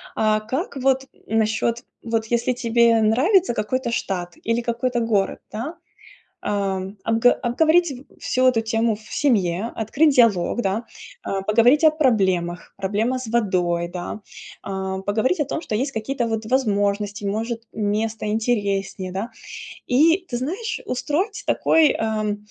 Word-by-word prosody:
А 215 Hz, -1 st, +2 dB
как 265 Hz, -, -4 dB
вот 265 Hz, 0 st, +1 dB, 0.2 s
насчет, 225 Hz, +2 st, 0 dB, 0.2 s
вот 225 Hz, -1 st, -1 dB
если 235 Hz, +2 st, +1 dB
тебе 235 Hz, -1 st, +3 dB
нравится 275 Hz, -, +3 dB
какой-то 235 Hz, +3 st, -2 dB
штат 180 Hz, -6 st, -3 dB
или 230 Hz, +1 st, 0 dB
какой-то 240 Hz, +1 st, -1 dB
город, 220 Hz, -4 st, 0 dB
да, 250 Hz, +10 st, -5 dB, 0.7 s
а, 200 Hz, -2 st, 0 dB, 0.3 s
обго 225 Hz, +2 st, +4 dB
обговорить 320 Hz, +7 st, +2 dB, 0.3 s
всю 255 Hz, 0 st, +1 dB
эту 250 Hz, -3 st, +4 dB
тему 225 Hz, 0 st, 0 dB
в -, -, -17 dB
семье, 205 Hz, -6 st, +1 dB
открыть 275 Hz, +7 st, +2 dB
диалог, 230 Hz, -4 st, +3 dB
да. 210 Hz, +2 st, -1 dB, 0.4 s
А, 195 Hz, -, -2 dB
поговорить 235 Hz, +9 st, +4 dB
о 315 Hz, -, +8 dB
проблемах, 190 Hz, -, 0 dB
проблемах 215 Hz, +6 st, -1 dB
с 240 Hz, -, -7 dB
водой, 180 Hz, -7 st, 0 dB
да. 175 Hz, +4 st, -6 dB, 0.4 s
А, 190 Hz, -1 st, -3 dB
поговорить 220 Hz, -, 0 dB
о 295 Hz, -, +1 dB
том, 320 Hz, +4 st, -3 dB
что -, -, -4 dB
есть 265 Hz, +6 st, -1 dB
какие-то 240 Hz, +2 st, -2 dB
вот 225 Hz, -1 st, -2 dB
возможности, 205 Hz, -4 st, 0 dB
может, 225 Hz, +3 st, -2 dB
место 215 Hz, +1 st, -2 dB
интереснее, 200 Hz, -4 st, -1 dB
да. 200 Hz, +5 st, -4 dB, 0.6 s
И, 325 Hz, +8 st, +4 dB
ты 240 Hz, -, -3 dB
знаешь, 360 Hz, -, -3 dB
устроить 320 Hz, -, -2 dB
такой, 320 Hz, -2 st, +4 dB
э, 215 Hz, -2 st, -1 dB
225 Hz, 140 wpm, -22 LUFS, 205-255 Hz, 0.7 s, о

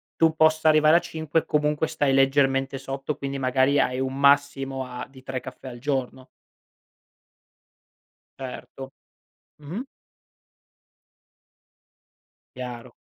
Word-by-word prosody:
tu 160 Hz, -1 st, +3 dB
possa 155 Hz, 0 st, +4 dB
arrivare 155 Hz, +2 st, +6 dB
a -, -, +3 dB
5, 160 Hz, -2 st, -2 dB
comunque 150 Hz, +1 st, +1 dB
stai 140 Hz, -2 st, 0 dB
leggermente 135 Hz, 0 st, +2 dB
sotto, 135 Hz, +2 st, -4 dB
quindi 140 Hz, 0 st, -4 dB
magari 130 Hz, +2 st, +2 dB
hai 125 Hz, +1 st, +1 dB
un 130 Hz, 0 st, -2 dB
massimo 140 Hz, -1 st, +2 dB
a 125 Hz, 0 st, -7 dB
di 130 Hz, -1 st, -16 dB
3 130 Hz, -1 st, -4 dB
caffè 130 Hz, +1 st, -10 dB
al 120 Hz, -1 st, -8 dB
giorno. 130 Hz, -1 st, -3 dB, 2.1 s
Certo. 135 Hz, 0 st, -8 dB, 0.7 s
Mh-mh. 195 Hz, -, -6 dB, 2.7 s
Chiaro. 125 Hz, -1 st, -7 dB
135 Hz, 105 wpm, -25 LUFS, 130-150 Hz, 2.7 s, arrivare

